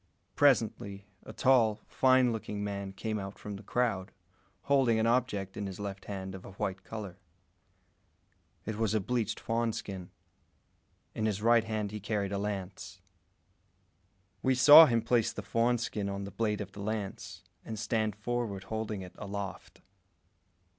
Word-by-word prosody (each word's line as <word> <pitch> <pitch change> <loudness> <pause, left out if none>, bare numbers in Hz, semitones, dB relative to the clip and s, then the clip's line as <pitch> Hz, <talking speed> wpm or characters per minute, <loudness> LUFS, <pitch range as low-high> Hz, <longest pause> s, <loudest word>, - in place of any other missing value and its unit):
Presently, 110 -7 +2 0.2
a - - -10
tall, 115 -3 +4
fine 130 -2 +4
looking 105 -2 -4
man 100 -1 -4
came 110 +2 -3
out 95 0 -7
from 105 -1 -7
the 100 - -9
crowd, 100 -4 -1 0.5
holding 135 -5 +3
an 110 - +2
object 115 -6 0
in 100 -1 -3
his 95 -1 -7
left 100 -1 -6
hand 95 -2 -5
of 95 - -9
a 95 - -11
white 95 -1 -3
colour. 100 -4 -7 1.5
It 110 -1 -4
was 110 -1 +1
a - - +3
bleached 115 +2 -1
fawn 115 0 0
skin. 95 -4 -6 1.0
In 110 - -1
his 105 -1 -2
right 115 -1 +5
hand 110 -2 -2
he 105 - -5
carried 100 -1 -2
a 100 - -1
lance. 95 -3 -5 1.4
We 130 0 +2
saw 150 +5 +10
him 115 -2 +1
place 115 -1 +2
the 105 - -7
fawn 115 +4 +2
skin 105 -3 -3
on 100 0 -4
the 100 - -7
blade 105 -2 -1
of 100 -2 -6
the 100 - -9
lance, 105 -1 -5 0.2
and 110 - -6
stand 110 -1 -1
forward 110 -3 -3
holding 110 -1 -4
it 90 - -11
aloft. 100 -1 -6
105 Hz, 160 wpm, -31 LUFS, 100-115 Hz, 1.5 s, saw